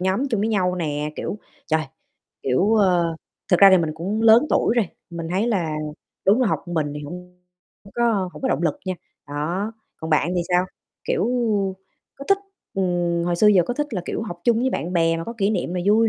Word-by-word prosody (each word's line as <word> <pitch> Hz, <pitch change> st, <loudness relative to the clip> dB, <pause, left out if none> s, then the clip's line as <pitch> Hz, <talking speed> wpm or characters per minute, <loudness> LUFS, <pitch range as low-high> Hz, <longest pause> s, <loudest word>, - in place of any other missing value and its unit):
nhóm 190 Hz, +9 st, 0 dB
chung 225 Hz, -6 st, 0 dB
với 220 Hz, -, +1 dB
nhau 185 Hz, -4 st, +1 dB
nè. 150 Hz, -3 st, -2 dB
Kiểu, 210 Hz, -, -4 dB, 0.3 s
trời, 160 Hz, -1 st, +1 dB, 0.6 s
kiểu, 185 Hz, -, +2 dB
ờ 175 Hz, -6 st, +2 dB, 0.3 s
thực 180 Hz, -, +4 dB
ra 195 Hz, -1 st, +10 dB
thì 190 Hz, -, +6 dB
mình 160 Hz, -3 st, 0 dB
cũng 195 Hz, +8 st, -2 dB
lớn 225 Hz, +6 st, +7 dB
tuổi -, -, +2 dB
rồi, 215 Hz, -7 st, +2 dB, 0.2 s
mình 170 Hz, -1 st, -5 dB
thấy 195 Hz, +6 st, +1 dB
là 170 Hz, -9 st, 0 dB, 0.5 s
đúng 210 Hz, +6 st, +5 dB
là -, -, +3 dB
học -, -, -1 dB
một 175 Hz, -, -5 dB
mình 150 Hz, -3 st, 0 dB
thì 150 Hz, -, -5 dB
hông 180 Hz, +3 st, -10 dB, 0.4 s
hông 195 Hz, -, -15 dB
có 225 Hz, -6 st, +1 dB
hổng -, -, -11 dB
có 265 Hz, -, +1 dB
động -, -, 0 dB
lực 290 Hz, -, 0 dB
nha. 185 Hz, -, -1 dB, 0.3 s
Đó, 170 Hz, +9 st, -2 dB, 0.2 s
còn 160 Hz, 0 st, -6 dB
bạn 155 Hz, +1 st, +3 dB
thì 175 Hz, -, +1 dB
sao? 180 Hz, +1 st, +2 dB, 0.4 s
Kiểu, -, -, 0 dB, 0.9 s
có 275 Hz, -, -8 dB
thích 395 Hz, -, +4 dB, 0.4 s
ừm, 175 Hz, -3 st, 0 dB
hồi 175 Hz, 0 st, 0 dB
xưa 210 Hz, -, +4 dB
giờ 200 Hz, -4 st, +6 dB
có 245 Hz, -, -2 dB
thích 295 Hz, +3 st, -1 dB
là, 180 Hz, -, -2 dB
kiểu, -, -, -3 dB
học 175 Hz, -6 st, -7 dB
chung 235 Hz, -1 st, +3 dB
với 260 Hz, -, +1 dB
bạn 170 Hz, -, -3 dB
bè 165 Hz, -1 st, +2 dB
mà 165 Hz, -, -4 dB
có 230 Hz, -, -5 dB
kỷ 200 Hz, 0 st, +2 dB
niệm 205 Hz, -, -2 dB
nè, 180 Hz, -, -1 dB
vui 220 Hz, +2 st, +5 dB
185 Hz, 230 wpm, -22 LUFS, 170-220 Hz, 0.9 s, ra